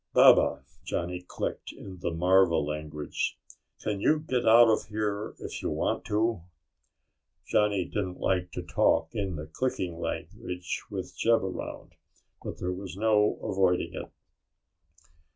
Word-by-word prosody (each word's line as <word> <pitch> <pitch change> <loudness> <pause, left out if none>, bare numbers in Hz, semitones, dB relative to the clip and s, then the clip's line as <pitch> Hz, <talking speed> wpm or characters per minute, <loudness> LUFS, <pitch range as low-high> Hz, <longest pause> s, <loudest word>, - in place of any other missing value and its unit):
"Baba," 65 - +6 0.2
Johnny 90 +1 -3
clicked 90 - -4
in 95 -2 -10
the 85 - -1
marva 90 +1 +4
language, 75 0 -3 0.5
"can 105 -2 -1
you 155 - +4
get 125 -6 -1
out 115 +1 +8
of 110 - +2
here, 105 -1 -2
if - - -6
you - - -1
want - - -1
to?" 110 -2 +1 1.1
Johnny 105 -3 +2
didn't 95 -2 -3
like 90 -1 0
to - - -4
talk 80 - +2
in 100 -5 -2
the 75 0 -5
clicking 90 -1 -2
language 90 0 -4
with - - -5
Jeb 115 -2 +3
around, 95 -1 -6 0.5
but - - -5
there 90 +1 -2
was 95 0 -7
no 105 -1 +3
avoiding 95 -4 +1
it. - - -7
95 Hz, 135 wpm, -28 LUFS, 90-105 Hz, 1.1 s, out